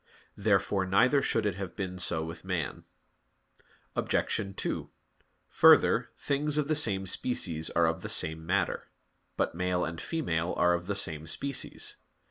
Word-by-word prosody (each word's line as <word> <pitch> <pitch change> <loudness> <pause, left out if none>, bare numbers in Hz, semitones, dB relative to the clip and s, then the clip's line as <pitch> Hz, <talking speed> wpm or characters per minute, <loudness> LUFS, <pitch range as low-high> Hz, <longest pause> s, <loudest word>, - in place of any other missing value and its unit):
Therefore 100 -2 +1
neither 125 +9 +4
should 115 -5 0
it 105 - +1
have 95 -2 -6
been 90 -2 -4
so 80 -2 -1
with 80 +1 -8
man. 90 -7 -3 1.1
Obj. 95 -1 -1
2: - - -3 0.6
Further, - - +5
things 145 +1 0
of 150 -2 +1
the 155 - +1
same 100 -10 +2
species 85 -6 -1
are 85 - +2
of 80 0 0
the - - -5
same 80 0 +1
matter. 95 +4 -1 0.5
But - - 0
male 90 +1 0
and 80 0 -5
female 90 - -1
are 90 0 +4
of 85 +1 -3
the 100 - -1
same 80 -5 -2
species. 140 +9 -2
95 Hz, 150 wpm, -29 LUFS, 85-105 Hz, 1.1 s, Further